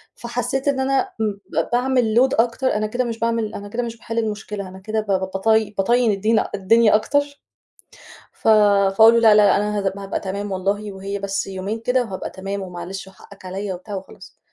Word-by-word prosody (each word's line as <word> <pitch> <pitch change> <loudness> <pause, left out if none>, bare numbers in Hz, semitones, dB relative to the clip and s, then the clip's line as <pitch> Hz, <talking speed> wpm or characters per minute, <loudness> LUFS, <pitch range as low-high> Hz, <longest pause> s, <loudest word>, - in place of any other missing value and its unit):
فحسّيت 270 +1 -3
إن 280 -2 +1
أنا 265 0 0
م 215 -1 +1 0.2
ب - - -1
باعمل 245 -2 +1
load 260 -2 +4
أكتر، 245 +3 -1
أنا 215 0 0
كده 245 +4 -1
مش 230 -2 -4
باعمل 230 -1 -1
أنا 205 - -7
كده 240 +4 -2
مش 230 -1 -6
باحِل 230 0 -7
المشكلة 210 -2 -4
أنا 185 +1 -11
كده 215 +3 -2
ب 215 - -14
ب 200 - -1 0.2
بط 195 +3 -3 0.3
بطيِّن 235 +3 +3
الدينا 215 +3 +1
الدنيا 215 +3 +4
أكتر 285 +6 0 0.9
ف - - -4
فأقول 210 +1 +5
له: 235 - +4
"لا، 220 -2 +6
لا، - - +5
لأ، - - +4
أنا 210 +1 -1
هات 195 -1 -1
هابقى 195 0 -4
تمام 200 +1 -4
والله 200 +2 -2
وهي 195 +1 -5
بس 195 0 -2
يومين 195 +3 -4
كده 250 +2 +1
وهابقى 195 -5 -6
تمام." 195 +1 -5
ومعلش 185 +2 -7
وحقّك 195 0 -16
عليَّ 190 +2 -4
وبتاع 185 +3 -8
وخلاص. 190 0 -11
210 Hz, 200 wpm, -21 LUFS, 195-230 Hz, 0.9 s, لا